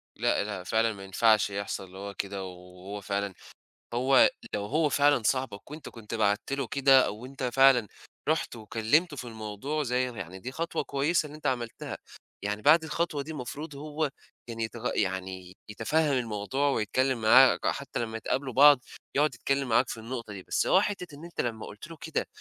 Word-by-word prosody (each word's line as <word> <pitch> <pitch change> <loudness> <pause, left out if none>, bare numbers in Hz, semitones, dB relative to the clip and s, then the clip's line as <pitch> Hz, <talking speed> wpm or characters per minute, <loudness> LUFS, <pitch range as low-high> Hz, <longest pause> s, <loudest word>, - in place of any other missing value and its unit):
لأ، - - +1
لأ، 100 -3 -5
فعلًا 110 +4 +1
ما 100 -1 -10
ينفعش 105 +2 +3
يحصل 100 0 -4
اللي 95 +1 -13
هو 100 +1 -6
كده 100 -1 -4
و 95 - -6
وهو 90 +3 -9
فعلًا 100 0 -2 0.6
هو 130 +2 +5 0.2
لو 100 -1 -1
هو 150 +7 +1
فعلًا 145 0 +4
صاحبك 130 -1 -1
وأنت 155 +1 -8
كنت 115 -1 -10
بعتت 110 +4 +1
له 135 -3 -2
كده 135 0 +5
أو - - -3
وأنت 130 +1 -8
فعلًا 125 -2 +5 0.4
رُحت 160 -6 0
وكلِّمته 115 - +1
في - - -5
الموضوع 110 +6 -4
زي 125 0 0
ر 120 - -11
يعني 95 0 -7
دي 125 +7 -6
خطوة 165 +2 -2
كويسة 150 +5 +1
اللي 150 0 -9
أنت 155 - -4
عملتها، 120 -3 -3 0.4
يعني 105 +1 -3
بعد 160 +5 +6
الخطوة 160 -2 -1
دي 160 - -7
مفروض 145 +2 -6
هو 150 +2 -4
يعني 150 - +1 0.4
كان 115 -1 -7
يتغ 115 +2 -3
يعني 95 -2 -2 0.2
يتفهَّم 145 +9 +1
الموضوع 125 +3 0
ويتكلِّم 130 +1 0
معاك، 125 +4 +6
حتّى 140 -3 -2
لمّا 115 -1 -3
ي - - -7
تقابلوا 130 +2 -2
بعض 145 0 +8 0.4
يقعُد 145 -2 +2
يتكلِّم 135 +1 -1
معاك 115 +2 +3
في - - -4
النقطة 115 -2 -6
دي، 95 -2 -8
بس - - 0
هو 190 - +5
حتة 180 -7 -4
إن 150 - -12
أنت 170 - -3
لمّا 110 -2 -3
قُلت 105 +9 -10
له 165 -1 -10
كده 160 - -2
125 Hz, 195 wpm, -28 LUFS, 105-145 Hz, 0.6 s, بعض